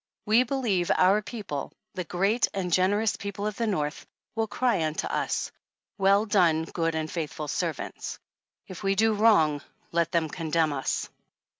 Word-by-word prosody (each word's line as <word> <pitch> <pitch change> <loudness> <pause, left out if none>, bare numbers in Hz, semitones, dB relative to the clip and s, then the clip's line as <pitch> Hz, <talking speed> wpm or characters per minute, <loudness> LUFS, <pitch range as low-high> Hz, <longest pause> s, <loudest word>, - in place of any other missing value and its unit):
We 220 +3 +5
believe 235 -9 0
our 190 +3 +4
people, 205 - -5 0.2
the 180 - -3
great 195 +7 +1
and 180 -3 -2
generous 200 +4 +2
people 200 0 -5
of 210 -1 -3
the 230 - 0
North, 150 -7 -2 0.3
will 225 0 -1
cry 225 -6 +1
unto 155 0 -1
us: - - -1 0.5
Well 200 +2 +4
done, 175 -7 +3
good 165 0 -2
and 155 -1 -2
faithful 155 -2 -4
servants. - - -3 0.5
If 185 0 -9
we 195 -1 +1
do 220 +2 +3
wrong, 200 -9 +4 0.3
let 170 -1 +1
them 170 -2 +1
condemn 160 -1 0
us. 135 -1 -2
185 Hz, 155 wpm, -27 LUFS, 160-210 Hz, 0.5 s, We